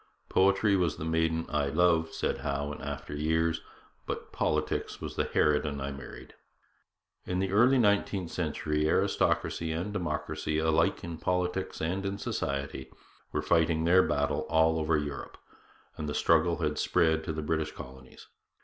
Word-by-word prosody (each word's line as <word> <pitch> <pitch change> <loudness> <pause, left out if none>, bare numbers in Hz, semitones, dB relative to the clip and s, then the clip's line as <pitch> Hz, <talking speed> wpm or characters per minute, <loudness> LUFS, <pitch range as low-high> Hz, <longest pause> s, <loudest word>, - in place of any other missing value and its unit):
'Poetry 100 +2 +3
was 85 -5 +1
the 80 - -5
maiden 80 0 +1
I 75 -1 0
loved,' 80 +1 +2
said - - -1
Howe 70 +1 -2
in - - -9
after 70 0 -6
years, 80 +2 0 0.5
'but - - -5
politics - - -1
was - - -6
the - - 0
harridan 75 -1 +1
I 70 +1 -3
married.' 70 -1 -10 0.9
In 90 - -1
the 95 0 0
early 120 +6 +5
nineteenth 100 -5 +1
century 75 -2 -1
aristocracy 80 0 +1
and 90 +6 -3
democracy, 75 -4 -2
alike 80 0 +2
in 85 -2 -6
politics 90 +1 -1
and 90 +5 -1
in 100 0 -2
society, 70 -7 -3 0.4
were - - -1
fighting 80 -1 +2
their 90 +3 +6
battle 70 -4 0
all 80 0 +3
over 80 0 +2
Europe, 75 -1 -5 0.6
and 75 -2 -4
the 75 - -3
struggle 85 +1 +3
had 75 0 0
spread 80 -1 +2
to - - -2
the 80 0 -4
British 75 0 -1
colonies. 65 0 -12
80 Hz, 155 wpm, -29 LUFS, 75-90 Hz, 0.9 s, their